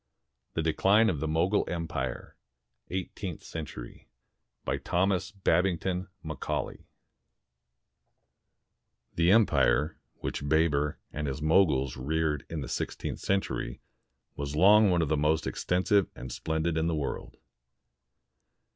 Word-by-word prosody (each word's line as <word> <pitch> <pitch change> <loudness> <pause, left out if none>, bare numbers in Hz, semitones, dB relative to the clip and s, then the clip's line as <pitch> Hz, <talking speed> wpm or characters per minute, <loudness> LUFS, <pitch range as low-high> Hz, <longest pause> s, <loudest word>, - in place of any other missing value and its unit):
THE 80 - 0
DECLINE 100 +7 +4
OF 75 - -4
THE 80 - -2
MOGUL 85 +6 +2
EMPIRE 80 -7 -4 0.5
[Eighteenth 95 -1 -5
century] 60 -7 -8 0.6
BY - - -1
THOMAS 90 +1 0
BABINGTON 90 +1 +1 0.2
MACAULAY 80 -1 -4 2.3
The 85 +2 +3
empire 80 - +3 0.2
which 70 - -4
Baber 75 -2 +2 0.2
and 75 0 -3
his 70 +1 -3
Moguls 75 -5 +3
reared 75 +2 -1
in 80 -2 -4
the 65 - -5
sixteenth - - -3
century 95 -10 -1 0.6
was 70 0 -4
long 105 +5 +6
one 85 -2 +3
of 75 - -2
the 80 - +3
most 75 +2 +1
extensive 95 +2 +1
and 65 0 -8
splendid 80 +4 -1
in 80 - +1
the 85 - 0
world. 75 -3 -4
80 Hz, 115 wpm, -29 LUFS, 75-90 Hz, 2.3 s, long